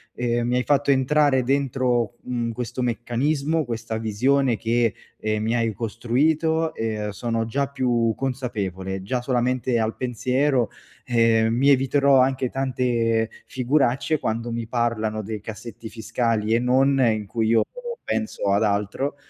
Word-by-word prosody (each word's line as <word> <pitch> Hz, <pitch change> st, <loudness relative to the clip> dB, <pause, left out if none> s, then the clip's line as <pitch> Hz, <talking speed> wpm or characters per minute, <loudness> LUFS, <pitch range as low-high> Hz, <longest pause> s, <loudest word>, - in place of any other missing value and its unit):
ehm, 120 Hz, -1 st, 0 dB
mi 125 Hz, -, +1 dB
hai 125 Hz, -, +1 dB
fatto 145 Hz, +1 st, +1 dB
entrare 135 Hz, 0 st, +3 dB
dentro, 125 Hz, -3 st, 0 dB
mhmm, 120 Hz, -2 st, -2 dB
questo 125 Hz, +2 st, -4 dB
meccanismo, 140 Hz, +6 st, 0 dB
questa 115 Hz, -3 st, -4 dB
visione 120 Hz, +3 st, +1 dB
che, 115 Hz, -1 st, +1 dB, 0.2 s
ehm, 110 Hz, 0 st, -2 dB
mi 115 Hz, +1 st, 0 dB
hai 115 Hz, -2 st, +1 dB
costruito 155 Hz, -, 0 dB
e 110 Hz, -3 st, -3 dB
sono 115 Hz, +2 st, -2 dB
già 140 Hz, +5 st, -1 dB
più 125 Hz, -4 st, +1 dB
consapevole. 100 Hz, -8 st, -3 dB
Già 125 Hz, +5 st, -2 dB
solamente 125 Hz, 0 st, 0 dB
al 110 Hz, -1 st, -1 dB
pensiero. 130 Hz, 0 st, 0 dB, 0.3 s
Ehm, 115 Hz, -2 st, +3 dB
mi 135 Hz, +4 st, +3 dB
eviterò 135 Hz, 0 st, +4 dB
anche 130 Hz, -1 st, +1 dB
tante 120 Hz, -4 st, 0 dB, 0.2 s
figuracce 135 Hz, +3 st, +1 dB
quando 115 Hz, 0 st, -2 dB
mi 115 Hz, -1 st, -3 dB
parlano 110 Hz, -2 st, -1 dB
dei 105 Hz, 0 st, -6 dB
cassetti 110 Hz, +1 st, -8 dB
fiscali 110 Hz, 0 st, 0 dB
e -, -, +4 dB
non 135 Hz, +3 st, +3 dB
in 110 Hz, -3 st, 0 dB
cui 110 Hz, +1 st, -1 dB
io 115 Hz, -1 st, +4 dB, 0.4 s
penso 220 Hz, -, -1 dB
ad 100 Hz, -, +3 dB
altro. 105 Hz, +7 st, -1 dB
120 Hz, 140 wpm, -23 LUFS, 110-130 Hz, 0.4 s, eviterò